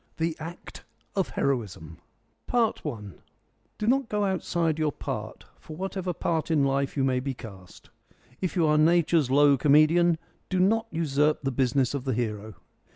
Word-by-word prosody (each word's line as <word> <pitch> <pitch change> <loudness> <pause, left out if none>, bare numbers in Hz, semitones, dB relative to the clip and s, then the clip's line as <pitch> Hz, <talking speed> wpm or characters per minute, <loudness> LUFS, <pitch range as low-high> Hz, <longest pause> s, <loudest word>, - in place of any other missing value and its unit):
THE 160 0 -1
ACT 165 +3 -9 0.3
OF 195 -2 0
HEROISM 100 - -2 0.5
I 235 -3 +3 1.0
Do 215 - -3
not 255 +1 +2
go 210 -1 0
outside 170 -4 -1
your 155 -1 +1
part, - - -6
for 155 - -10
whatever 190 0 -3
part 165 -1 -2
in 155 -3 +3
life 140 +1 0
you 135 - +2
may 130 -1 +1
be 135 0 -4
cast. 95 -6 -13 0.5
If 185 0 -2
you 170 -3 +3
are 150 0 +3
Nature's 165 -3 +3
low 140 +1 +5
comedian, 155 +4 +4 0.3
do 185 - 0
not 220 +5 +2
usurp 150 -2 0
the 135 - 0
business 130 +1 +1
of 140 -2 -4
the 130 -4 0
hero. 110 -3 -3
155 Hz, 160 wpm, -26 LUFS, 135-175 Hz, 1.0 s, low